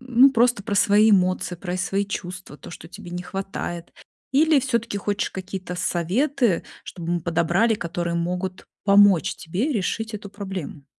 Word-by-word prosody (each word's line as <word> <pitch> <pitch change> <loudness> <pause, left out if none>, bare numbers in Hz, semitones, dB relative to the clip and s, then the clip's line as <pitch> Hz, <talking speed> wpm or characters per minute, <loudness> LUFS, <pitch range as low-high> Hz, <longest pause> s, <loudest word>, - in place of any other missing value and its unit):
ну, 255 +2 +5
просто 240 -3 +3
про 200 - -3
свои 210 +2 +5
эмоции, 185 -2 +2
про 180 0 -5
и - - -1
свои 195 +2 0
чувства, 185 -5 -6
то, 140 - -12
что 165 0 -10
тебе 175 0 -10
не 180 0 -4
хватает? 180 -2 -5 0.4
Или 305 0 +4
всё-таки 235 -4 -1
хочешь 200 0 -2
какие-то 185 -1 -6
советы, 205 - +1 0.2
чтобы 170 -1 -5
мы 175 - 0
подобрали, 170 +7 +2
которые 170 -2 -3
могут 180 +2 -3 0.2
помочь 200 -3 +5
тебе 190 - -2
решить 220 +1 -2
эту 205 -1 -7
проблему? 190 -8 -6
190 Hz, 160 wpm, -23 LUFS, 175-215 Hz, 0.4 s, ну